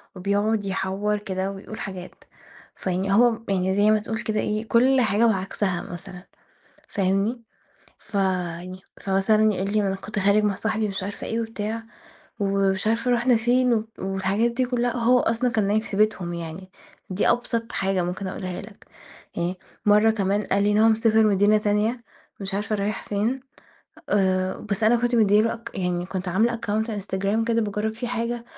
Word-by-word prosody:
وبيقعد 205 +3 0
يحوّر 195 +2 -1
كده 195 -1 -3
وبيقول 195 +2 -9
حاجات، 185 -3 -6 0.6
فيعني 190 +1 -1
هو 240 +3 +6
م 225 0 -7
يعني 190 -1 +1
زي 205 +1 +4
ما 215 - +4
تقول 220 +1 -4
كده 215 -1 -1
إيه 215 +2 -2
كل 255 +3 +4
حاجة 220 +1 +3
وعكسها 190 -3 -1
مثلًا 180 0 -9 0.7
فاهمني، 200 +5 0 0.6
فيعني 185 -2 -2 0.2
فمثلًا 215 +2 +3
يقول 195 +2 -2
لي 215 - +3
ما 200 - 0
أنا 195 - -1
كنت 205 +2 -6
خارج 200 +2 +3
مع 205 -1 +1
صاحبي 220 +1 -1
مش 195 -1 -4
عارفة 200 +1 -5
إيه 225 - -1
وبتاع 225 0 -4 0.6
ومش 195 0 +1
عارفة 230 +3 +1
رُحنا 245 0 +3
فين 245 +2 +2
و 215 - 0
والحاجات 195 +4 0
دي 250 +2 0
كلّها 245 -1 -1
وهو 245 +1 +4
أصلًا 235 +2 +1
كان 215 -3 +1
نايم 210 +2 +2
في 215 -2 -6
بيتهم 200 -5 +1
يعني، 170 +3 -7 0.4
دي 185 +2 +1
أبسط 230 -1 -1
حاجة 195 -2 0
ممكن 180 +3 -4
أقولها 185 -1 -5
لك، 200 0 -14 0.5
أي 175 +2 -1 0.3
مَرّة 210 +2 +5
كمان 205 -1 0
قال 200 +1 +1
لي 205 +1 +2
إن 205 - +2
هو 220 +1 +5
سافر 220 0 +3
مدينة 205 +1 +4
تانية 210 +3 0 0.4
مش 195 0 -4
عارفة 210 +2 -1
رايح 200 0 -2
فين 220 +6 0 0.7
آآ 185 -2 +1
بس 200 +2 -1
أنا 230 +2 +5
كنت 240 +1 0
مديّ 210 -2 +5
له 230 - +1
أك 230 0 -9
يعني 180 -2 -2
كنت 185 0 -4
عاملة 225 +6 +2
account 220 -1 -1
Instagram 200 +1 -1
كده 230 0 +2
باجرّب 210 +1 -2
فيه 240 +2 -5
حاجة 235 0 -3
205 Hz, 175 wpm, -24 LUFS, 195-225 Hz, 0.7 s, هو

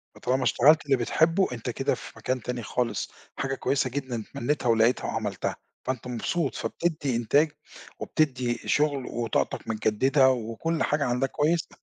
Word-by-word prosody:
فطالما 130 +1 0
اشتغلت 150 +6 +5
اللي 140 -2 +3
بتحبُه، 165 +9 +2
أنت 120 -2 -4
كده - - 0
في - - -10
مكان 130 0 -2
تاني 125 +1 -4
خالص، 120 +1 -2 0.3
حاجة 135 0 -1
كويسة 130 0 0
جدًا 130 -3 -3
اتمنيتها 125 +5 -2
ولقيتها 115 +2 +3
وعملتها، - - -2 0.3
فأنت 130 -2 -3
مبسوط، 135 +5 -1
فبتدّي 150 -7 -1
إنتاج 145 +7 +3 0.5
وبتدّي 130 -6 0
شُغل، 145 -3 +1
وطاقتَك 115 -2 -2
متجددة، 120 +5 +3
وكُلّ 125 +8 -2
حاجة 150 -1 +1
عندَك 125 +2 0
كويسة. 160 +2 0
130 Hz, 140 wpm, -27 LUFS, 120-150 Hz, 0.5 s, اشتغلت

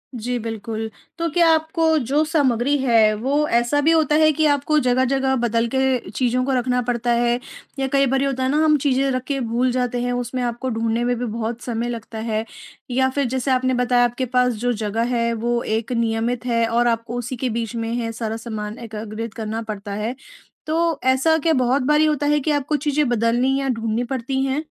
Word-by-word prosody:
जी, 245 +2 -2
बिल्कुल। 225 0 -4 0.3
तो 335 0 -1
क्या 340 +1 +4
आपको 320 0 +1
जो 280 +5 +1
सामग्री 285 -3 +2
है, 230 -5 +4
वो 275 +8 0
ऐसा 240 +4 +2
भी 320 - +3
होता 315 -2 +3
है 310 0 +5
कि 310 +2 +1
आपको 290 +1 +2
जगह-जगह 265 +1 +1
बदल 235 -1 +1
के 265 -5 +1
चीज़ों 250 +3 0
को 275 - -1
रखना 250 0 +1
पड़ता 240 0 -1
है 240 +1 +2 0.4
या 270 - 0
कई 275 0 +4
बार 265 +1 +1
ये 275 - +1
होता 260 -1 -2
है 260 - +1
ना, 295 - +1
हम 305 -1 +4
चीज़ें 275 -1 +1
रख 255 0 -2
के 280 -1 -1
भूल 245 +1 0
जाते 245 -1 -1
हैं, 245 0 -1
उसमें 245 +1 -3
आपको 240 +2 -2
ढूँढने 230 0 -1
में 245 0 +1
भी 245 - -2
बहुत 230 +1 -4
समय 235 0 -3
लगता 225 -1 -6
है 220 0 -2 0.5
या 260 +1 +2
फिर, 280 +1 -1
जैसे 260 +2 -1
आपने 255 0 +2
बताया 245 0 +2
आपके 240 +2 -2
पास 250 0 +2
जो 240 +3 -1
जगह 215 +1 -2
है, 235 0 +1
वो 235 +1 -1
एक 225 +2 -2
नियमित 230 +1 -1
है 230 -2 +2
और 240 +1 +2
आपको 230 +1 -1
उसी 245 +2 -4
के 255 +1 -1
बीच 230 0 -3
में 230 0 -3
है, 230 -1 -2
सारा 225 -1 -4
सामान 215 -1 -6
एकागृत 220 -1 -6
करना 225 0 -4
पड़ता 210 -2 -6
है। 215 +4 -3 0.5
तो 330 0 0
ऐसा 265 +5 +3
क्या 325 - +3
बहुत 255 +1 +2
बारी 300 +1 +4
होता 300 -1 0
है 295 0 +3
कि 300 +2 -1
आपको 290 +1 0
चीज़ें 295 0 +2
बदलनी 240 +3 +2
या 275 - -2
ढूँढनी 230 -1 -1
पड़ती 265 +1 -2
हैं? 270 +3 -1
245 Hz, 215 wpm, -21 LUFS, 230-270 Hz, 0.5 s, है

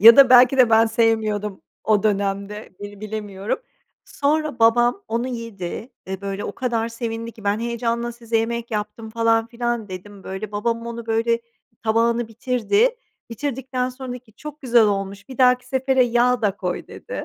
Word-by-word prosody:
ya 230 +3 +10
da 275 -2 +8
belki 250 +1 +7
de 250 -3 +5
ben 225 +1 +6
sevmiyordum 220 -3 0 0.2
o 210 -2 +3
dönemde, 200 0 -1
bil 205 0 -8
bilemiyorum. 210 -2 -4 0.5
Sonra 300 -1 -1
babam 240 - +4
onu 235 +3 -1
yedi 230 -2 -6 0.2
ve, 190 0 -4
böyle, 200 0 -4
o - - -4
kadar 230 -3 -1
sevindi 230 0 -5
ki 215 - -15
ben 200 +1 +1
heyecanla 235 0 -2
size 230 -1 -2
yemek 235 +1 -1
yaptım 215 +1 -4
falan 225 0 +2
filan 235 -2 -3
dedim, 190 +2 -9
böyle. 195 +2 -6
Babam 230 +2 -1
onu, 235 0 -6
böyle 230 +1 +1 0.4
tabağını 230 +1 +2
bitirdi. 255 - +1 0.3
Bitirdikten 255 0 -2
sonra 255 0 -8
dedi 250 - -7
ki 225 -4 -24
çok 300 +6 -10
güzel 240 -3 +4
olmuş, 200 0 -1
bir 260 - -10
dahaki 250 -1 +4
sefere 265 0 +2
yağ 245 +1 +2
da 205 -2 +1
koy, 180 -3 -3
dedi. - - -7
230 Hz, 165 wpm, -22 LUFS, 210-245 Hz, 0.5 s, ya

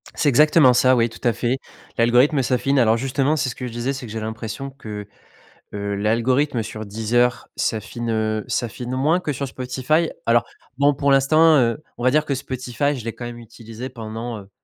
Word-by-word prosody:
C'est 145 - +2
exactement 150 0 +5
ça, 130 +1 +4
oui, 115 -1 +2
tout 115 - -13
à 115 - +3
fait. 125 +4 -1 0.4
L'algorithme 125 +5 +4
s'affine 130 +2 +1
alors, 115 -2 +4
justement, 135 +4 0
c'est 135 -4 0
ce - - -6
que 125 - -5
je - - -7
disais 120 +4 -2
c'est 130 -2 -7
que 105 - -9
j'ai 110 - -4
l'impression 110 +4 -5
que, 105 -7 -8 0.7
heu, 100 0 -3
l'algorithme 120 +5 +1
sur 110 0 -7
Deezer 115 +4 0
s'affine, 115 +2 -3
heu, 110 0 -1
s'affine 125 +1 -3
moins 150 +7 +2
que 150 -5 -3
sur 140 +2 -3
Spotify 130 +6 -1 0.2
alors, 115 0 +3 0.3
bon, 145 +1 +4
pour 140 0 +1
l'instant, 155 +4 +5
heu, 125 +3 +1
on 120 - -6
va 130 - +4
dire 155 +1 +2
que 140 - -1
Spotify, 130 +2 -2
je 125 - -7
l'ai 115 0 -4
quand 120 - -8
même 120 0 -7
utilisé 115 +2 -9
pendant, 115 -1 -6
heu, 100 0 -14
125 Hz, 200 wpm, -22 LUFS, 115-135 Hz, 0.7 s, exactement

